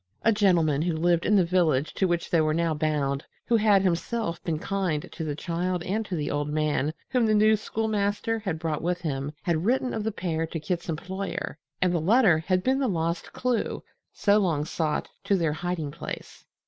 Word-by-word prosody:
A 225 - +5
gentleman 175 -9 +3
who 170 0 0
lived 170 +1 +2
in 210 - +4
the 190 -3 +5
village 160 -5 +2
to 190 - +1
which 175 -1 -1
they 170 - +4
were 155 0 +1
now 165 -1 +1
bound, 150 -2 0 0.2
who 235 - +2
had 210 -3 +4
himself 180 0 -1
been 165 -3 -1
kind 180 -3 -2
to 165 - -5
the 150 -2 -2
child 175 +2 -2
and 215 +5 -1
to 185 - -3
the 150 -3 -2
old 145 0 -1
man 150 -1 0 0.2
whom 250 -4 +2
the 215 - +3
new 215 +1 +5
schoolmaster 215 0 -1
had 190 -7 -3
brought 160 -2 -2
with 175 +1 -1
him, 140 -3 -2
had 170 -4 0
written 250 +4 +1
of 220 - -2
the 220 - -1
pair 165 -5 -2
to 165 - -4
Kit's 170 +3 -3
employer, 185 0 -4 0.2
and 180 -1 +2
the 170 - +1
letter 195 -2 +5
had 185 +3 0
been 265 +1 +2
the 270 - +1
lost 170 -3 -2
clue, 250 -2 -1 0.3
so 205 +1 +3
long 160 -7 +1
sought, 155 -2 -1 0.2
to 200 - +2
their 165 -4 +1
hiding 165 -3 -3
place. - - -8
175 Hz, 205 wpm, -26 LUFS, 155-205 Hz, 0.3 s, A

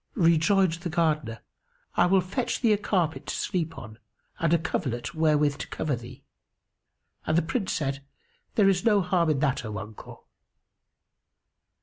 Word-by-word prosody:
Rejoined 170 +1 +4
the 175 - -3
Gardener, 155 -8 0 0.5
"I - - +4
will 190 +1 +4
fetch 215 +8 -2
thee 230 -4 +4
a - - +2
carpet 175 -6 -1
to - - -3
sleep 165 -3 -2
on 110 0 -10 0.4
and 165 -1 +1
a 170 - +5
coverlet 135 -7 -3
wherewith 150 -3 +2
to - - -5
cover 150 -4 -2
thee;" 120 0 -11 1.0
and 155 - +2
the 170 - +3
Prince 190 +4 -2
said, 140 -2 -2 0.5
"There 205 -3 +5
is 185 -2 +2
no 210 -3 +4
harm 180 -2 +1
in 150 - +2
that, 135 -2 +1
O 110 -2 -5
uncle." 110 0 -10
160 Hz, 155 wpm, -27 LUFS, 140-185 Hz, 1.0 s, a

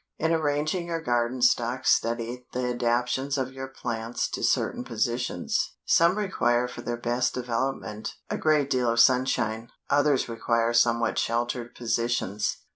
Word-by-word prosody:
In 160 +1 0
arranging 155 +3 0
your 165 -1 -2
garden 120 -3 0
stock 125 +1 +2
study 120 +2 0
the 125 - -1
adaptions 125 +3 0
of 130 -1 -2
your 135 0 -6
plants 120 -3 -3
to - - -4
certain - - +1
positions. 120 -4 -1
Some 170 +4 +4
require 125 - +1
for 125 - -8
their 120 0 -3
best 120 +2 0
development, 120 -3 -3
a - - -2
great 150 -3 +2
deal 125 -2 +2
of 115 0 +1
sunshine, 120 -3 +2 0.2
others 145 -1 +3
require 115 0 0
somewhat 115 -1 +2
sheltered 120 +1 -2
positions. 115 -3 -1
120 Hz, 140 wpm, -26 LUFS, 115-135 Hz, 0.2 s, Some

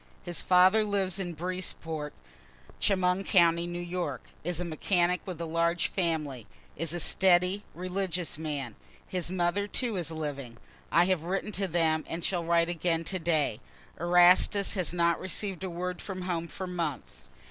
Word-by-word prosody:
His 175 -1 -1
father 185 +4 +5
lives 200 -2 0
at 175 -3 -4
Breesport, 165 -3 -3 0.7
Chemung 185 -1 +2
county, 170 -3 +4
N. 175 0 -5
Y., 175 -6 -2 0.3
is 175 0 -2
a 180 - -2
mechanic 175 +2 +1
with 180 -3 -5
large 170 +1 0
family 155 - -2 0.3
is 165 +1 -2
a 175 - -2
steady, 180 +3 +3
religious 180 -2 -3
man; 145 -7 -4 0.3
his 180 -2 -3
mother 185 +2 0
too 230 -1 -1
is 170 -3 -1
living. 140 -7 -5 0.3
I 170 - +5
have 185 -4 +1
written 195 +4 -2
to 195 -1 -1
them, 160 -2 +1
and 165 +1 -5
shall 175 -1 0
write 170 0 +3
again 170 -1 0
to 185 +3 -2
day 155 -9 0 0.4
Erastus 180 +3 +5
has 185 -5 0
not 170 -1 +2
receiv'd 190 0 -3
a 190 - -2
word 180 +1 -4
from 185 -2 -5
home 170 -2 -2
for 190 - -6
months. 150 - -4
175 Hz, 160 wpm, -29 LUFS, 165-185 Hz, 0.7 s, father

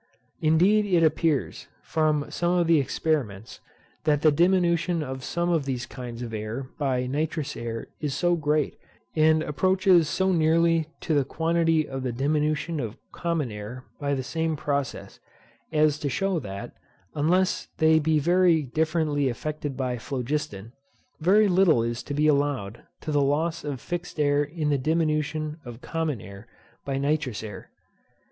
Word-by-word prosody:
Indeed, 185 +7 +4
it 175 -4 +3
appears, 155 -2 0 0.2
from 155 -2 +1
some 175 +1 +1
of 175 - +3
the 165 -2 +4
experiments, 130 -8 -2 0.4
that 150 -1 +2
the 155 - +6
diminution 170 0 +2
of 130 -2 -6
some 175 +5 -1
of 160 -5 +1
these 125 -2 -2
kinds 120 -1 -7
of 115 -2 -6
air 110 +4 -4 0.2
by 130 -3 0
nitrous 150 +2 -2
air 115 -1 -5
is 145 -3 -2
so 175 -1 +2
great, 150 -1 0 0.4
and 155 0 +4
approaches 185 +1 +3
so 190 0 +1
nearly 165 -1 +3
to 160 - -1
the 145 -2 +3
quantity 165 +1 +1
of 135 0 -5
the 130 -1 -2
diminution 150 +5 0
of 115 -4 -4
common 165 -8 -2
air 105 +5 -8
by 140 -1 0
the 130 - -3
same 160 +4 -1
process, 140 -2 -3 0.5
as 150 -1 +3
to 145 - -2
shew 195 +5 0
that, 100 -6 -7 0.4
unless 180 +5 +1
they 160 -1 +5
be 155 0 +2
very 170 +1 +3
differently 155 0 0
affected 145 +2 -4
by 125 -3 -2
phlogiston, 125 -4 -4 0.5
very 200 +6 +4
little 180 -10 +4
is 120 0 -2
to 145 - -5
be 150 +1 +2
allowed 140 -7 0 0.2
to 155 - -4
the 145 -1 +3
loss 155 +4 0
of 145 -3 -4
fixed 175 +1 -5
air 145 0 +3
in 150 0 -2
the 140 - +2
diminution 155 +1 -1
of 120 -2 -9
common 160 -4 -2
air 100 +3 -11 0.4
by 135 -1 -2
nitrous 140 -5 -1
air. 105 -3 -8
150 Hz, 155 wpm, -26 LUFS, 135-165 Hz, 0.5 s, the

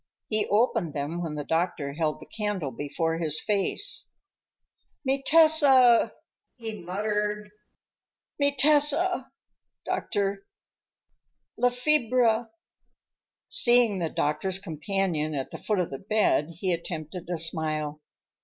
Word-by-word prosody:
He 215 -1 +1
opened 215 - +1
them 150 +4 -3
when 160 -3 -4
the 145 - -4
doctor 160 -3 -1
held 155 0 -1
the - - -12
candle 205 -9 -3
before 155 +6 -2
his 155 -2 0
face. 210 - -1 1.0
"Mi 270 +1 0
testa!" 285 -6 +5 0.4
he 225 -3 -6
muttered, 210 +3 -2 0.9
"mi 285 0 +2
testa," 300 +5 +3 0.6
doctor. 200 -1 -2 1.1
"La 250 - +3
fiebre!" 245 -3 +2 1.0
Seeing 240 -5 +4
the 165 -2 -1
doctor's 180 +7 -1
companion 165 -3 -2
at 135 -2 -4
the - - -7
foot 210 - -1
of 180 -2 -1
the 135 - -6
bed, 210 -7 +1
he 180 +2 -1
attempted 170 0 -6
a 175 - -1
smile. 155 -2 -2
195 Hz, 115 wpm, -26 LUFS, 160-240 Hz, 1.1 s, testa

